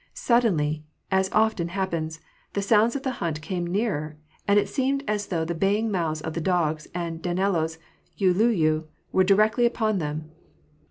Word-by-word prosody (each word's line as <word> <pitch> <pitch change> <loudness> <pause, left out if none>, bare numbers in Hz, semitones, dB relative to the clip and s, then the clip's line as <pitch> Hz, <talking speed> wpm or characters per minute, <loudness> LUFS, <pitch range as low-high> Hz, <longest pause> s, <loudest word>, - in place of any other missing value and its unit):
Suddenly, 160 -11 +1 0.3
as 190 0 +2
often 215 -6 +2
happens, 170 -4 -3 0.3
the 200 - -1
sounds 220 +4 +4
of 280 - -3
the 265 - 0
hunt 160 -3 -1
came 175 +1 -3
nearer, 170 -6 -1 0.3
and 200 0 +4
it 205 - +3
seemed 275 +1 0
as 210 -1 -1
though 165 -3 -1
the 170 - -2
baying 205 +6 +1
mouths 160 -5 -1
of 160 0 -4
the 165 - -3
dogs 155 -3 0
and 165 -2 -3
Danilo's 175 -3 0 0.4
uliuliu 180 -5 +3 0.3
were 190 - +4
directly 215 +5 +4
upon 220 -4 0
them. 155 0 -4
185 Hz, 160 wpm, -25 LUFS, 160-215 Hz, 0.4 s, sounds